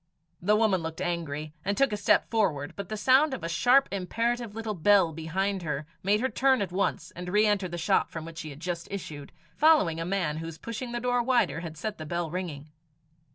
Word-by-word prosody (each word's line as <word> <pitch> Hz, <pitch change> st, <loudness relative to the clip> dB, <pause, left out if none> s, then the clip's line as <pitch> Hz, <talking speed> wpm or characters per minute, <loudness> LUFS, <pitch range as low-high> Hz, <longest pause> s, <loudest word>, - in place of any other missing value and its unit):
The 205 Hz, +4 st, +3 dB
woman 210 Hz, -5 st, +3 dB
looked 160 Hz, 0 st, -5 dB
angry, 155 Hz, -3 st, -3 dB
and 200 Hz, +1 st, -1 dB
took 275 Hz, -5 st, +3 dB
a -, -, +2 dB
step 205 Hz, -, +3 dB
forward; 160 Hz, -11 st, 0 dB
but 200 Hz, -2 st, -6 dB
the 215 Hz, -, -3 dB
sound 265 Hz, +6 st, +4 dB
of 240 Hz, -, -9 dB
a -, -, -1 dB
sharp 245 Hz, -, +4 dB
imperative 230 Hz, +4 st, -2 dB
little 225 Hz, -1 st, -3 dB
bell 190 Hz, -2 st, +4 dB
behind 190 Hz, +5 st, -2 dB
her, 150 Hz, -3 st, -3 dB, 0.2 s
made 205 Hz, +3 st, +2 dB
her 260 Hz, -, +2 dB
turn 260 Hz, +2 st, +2 dB
at 185 Hz, -, -6 dB
once, 180 Hz, -3 st, -1 dB
and 180 Hz, 0 st, -6 dB
re 210 Hz, +3 st, +4 dB
enter 205 Hz, -3 st, +1 dB
the 175 Hz, 0 st, -6 dB
shop 180 Hz, +4 st, +2 dB
from 160 Hz, -1 st, -6 dB
which 165 Hz, 0 st, -8 dB
she 155 Hz, -, -6 dB
had 140 Hz, 0 st, -10 dB
just 170 Hz, 0 st, -4 dB
issued, 155 Hz, -7 st, -7 dB, 0.2 s
following 290 Hz, -, +4 dB
a -, -, -1 dB
man 175 Hz, -5 st, -1 dB
whose 165 Hz, 0 st, -6 dB
pushing 230 Hz, +6 st, -6 dB
the 240 Hz, -, -2 dB
door 245 Hz, 0 st, +1 dB
wider 240 Hz, -8 st, +2 dB
had 165 Hz, -2 st, -7 dB
set 210 Hz, +4 st, -4 dB
the 155 Hz, -, -6 dB
bell 170 Hz, -1 st, -2 dB
ringing. 155 Hz, -5 st, -5 dB
185 Hz, 220 wpm, -28 LUFS, 165-220 Hz, 0.2 s, sound